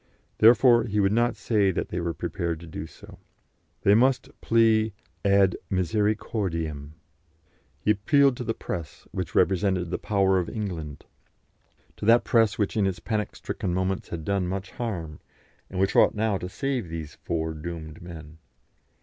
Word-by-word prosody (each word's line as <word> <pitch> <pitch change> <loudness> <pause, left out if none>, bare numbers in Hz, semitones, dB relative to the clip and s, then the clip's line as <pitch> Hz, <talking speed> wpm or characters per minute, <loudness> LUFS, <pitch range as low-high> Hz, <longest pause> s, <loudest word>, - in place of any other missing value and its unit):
Therefore 120 +1 +6
he 105 -2 -1
would 95 -1 +3
not 120 +2 +2
say 105 -2 +1
that 95 - -2
they 90 - -3
were 85 -1 -2
prepared 85 -2 -3
to - - -9
do 80 -1 -7
so. - - -15 0.6
They 100 - +5
must 125 +3 +3
plead 110 -2 +3 0.3
ad 100 -2 +4
misericordiam. 90 -6 -1 0.9
He 105 - +2
appealed 135 +6 +3
to - - -4
the 115 -1 -2
press, 80 -4 -6
which - - -5
represented 95 -2 +2
the - - -2
power 95 -2 +2
of 90 - -3
England; 85 -9 -5 0.9
to - - -5
that 115 +2 +6
press 115 -3 +3
which 105 -3 -1
in 105 -3 +2
its 95 -2 -2
panic 110 -2 -3
stricken 90 -2 -3
moments 95 +1 -1
had 80 -2 -5
done 100 -1 0
much 95 +1 -4
harm, 85 -10 -5 0.5
and 95 - -5
which 95 +1 +1
ought - - +5
now 105 -2 0
to 90 - -5
save 130 - -2
these 80 -3 -6
four 80 -1 -3
doomed 80 0 -7
men. 80 -2 -10
95 Hz, 160 wpm, -26 LUFS, 85-110 Hz, 0.9 s, Therefore